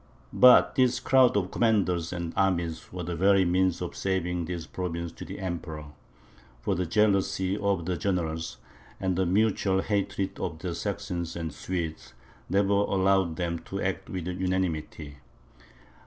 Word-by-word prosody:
But 125 0 +7
this 125 -1 +3
crowd 130 -5 +4
of 95 -2 -1
commanders 95 -7 +1
and 85 -2 -4
armies 85 -4 0
was 90 -1 -5
the 85 0 -3
very 95 +2 +4
means 90 0 +1
of 90 - -6
saving 90 -2 -1
this 85 -1 -5
province 85 -2 -4
to - - -9
the - - -7
Emperor; 80 -5 -5 0.7
for - - -1
the 90 0 -1
jealousy 95 0 +2
of 100 -4 0
the 90 0 -1
generals, 80 -4 -2 0.4
and 95 -1 0
the 95 0 +1
mutual 95 -1 +2
hatred 100 -2 -2
of 80 - -3
the 85 +1 -4
Saxons 95 -4 -4
and 85 -2 -4
the - - -15
Swedes, 80 -3 -4 0.4
never 100 +1 +2
allowed 95 -3 +2
them 85 -1 -2
to 95 - -6
act 95 0 -2
with 90 -3 -4
unanimity. 90 -5 -2
90 Hz, 155 wpm, -27 LUFS, 85-95 Hz, 0.7 s, But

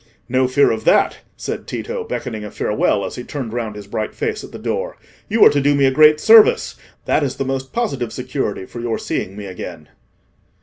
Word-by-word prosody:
"No 130 +1 +2
fear 140 +3 +3
of 110 -1 -3
that," - - +3 0.2
said - - -5
Tito, 475 0 -4
beckoning 120 - -5
a 105 - -6
farewell, 105 -1 0
as - - -6
he 125 - -5
turned 125 -5 -6
round 115 -3 -3
his 105 -1 -9
bright 105 +2 -4
face 445 -1 -3
at - - -10
the - - -8
door. - - -3 0.3
"You 220 +1 +5
are - - +9
to 145 - +1
do 145 +1 +3
me 140 -1 +3
a 135 - +4
great 150 +2 +6
service:—that 220 -5 +3
is 135 - -2
the 135 - -3
most 135 0 -3
positive 140 - -2
security 125 -6 -3
for 120 - -9
your 115 -1 -2
seeing 95 - -4
me 105 - -7
again." 90 -4 -8
130 Hz, 210 wpm, -19 LUFS, 110-150 Hz, 0.3 s, are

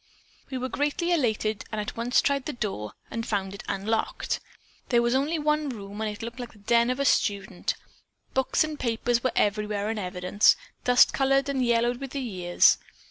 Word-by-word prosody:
"We 260 - -3
were 255 0 -2
greatly 295 +6 -1
elated 220 -9 +1
and 215 - -3
at 210 - -4
once 235 +2 +2
tried 280 -2 +1
the 300 - -3
door 195 - -4 0.2
and 230 - -3
found 195 -3 -2
it 200 - -8
unlocked. 215 +3 -1 0.5
There 240 - +4
was 235 +1 +2
only 285 +5 +1
one 300 -1 +1
room 205 -3 -7
and 220 - 0
it 210 +1 -7
looked 235 +2 -6
like 245 -1 -7
the - - -18
den 235 +3 +2
of 255 +2 -1
a 280 - +1
student. 200 -6 +1 0.6
Books 265 +4 +2
and 310 -1 -5
papers 235 0 0
were 255 - +2
everywhere 210 0 0
in 225 - -3
evidence; 180 +2 +3 0.3
dust 250 0 +6
covered 275 0 +2
and 270 -2 0
yellowed 240 0 +2
with 270 0 -7
the 280 - -2
years. 185 -8 +3
235 Hz, 190 wpm, -27 LUFS, 210-265 Hz, 0.6 s, dust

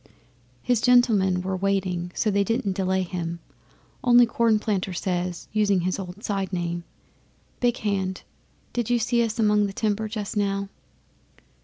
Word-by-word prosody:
'" 120 0 -35
'His 245 -3 +1
gentlemen 215 -8 +4
were 190 0 -2
waiting, 185 -2 -1
so 215 - +1
they 200 0 +2
didn't 205 -2 -1
delay 190 0 0
him, 170 -2 -4 0.7
only 245 -1 +7
Cornplanter 215 -5 0
says, 180 -1 -2
using 205 -3 +2
his 185 +2 -1
old 190 +2 -8
side 195 -2 -2
name, 175 -1 -2 0.8
"Big 245 -1 +1
Hand, 190 -3 -2 0.5
did 240 -2 -1
you 245 - +3
see 235 +1 +1
us 225 0 -2
among 210 -2 +3
the 195 - -7
timber 215 0 -1
just 210 -2 -5
now?" 200 -1 -1
200 Hz, 150 wpm, -25 LUFS, 185-220 Hz, 0.8 s, only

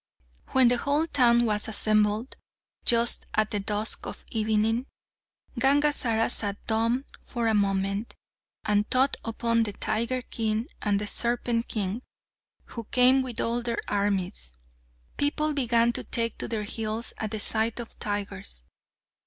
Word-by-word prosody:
When 260 -2 +4
the 245 - +3
whole 290 +5 +1
town 240 -6 +3
was 210 -2 +1
assembled, 215 +2 +1 0.5
just 235 0 +5
at 215 0 +1
the 210 - -1
dusk 210 +2 -1
of - - -8
evening, 220 +3 0 0.7
Gangazara 270 -5 +2
sat 205 -2 +1
dumb 230 +4 0 0.2
for 235 -2 -3
a 220 - +2
moment, 200 +1 -1 0.5
and 210 0 +1
thought 265 +2 +3
upon 230 0 0
the 210 -2 -1
Tiger 235 +5 -1
King 220 -1 -2 0.2
and 205 -1 +1
the 210 - -3
Serpent 235 +1 0
King, 205 +1 -3 0.6
who 230 -2 -8
came 255 +3 +5
with 255 -3 -4
all 235 +1 0
their 235 -1 -3
armies. 200 - -1 0.6
People 300 +1 0
began 235 -3 +2
to - - -1
take 230 -1 -1
to - - -2
their 220 -2 -2
heels 220 +1 -2
at 220 - -3
the 220 0 -4
sight 220 +2 +1
of 235 - -8
tigers. 200 - -4
225 Hz, 145 wpm, -26 LUFS, 210-240 Hz, 0.7 s, just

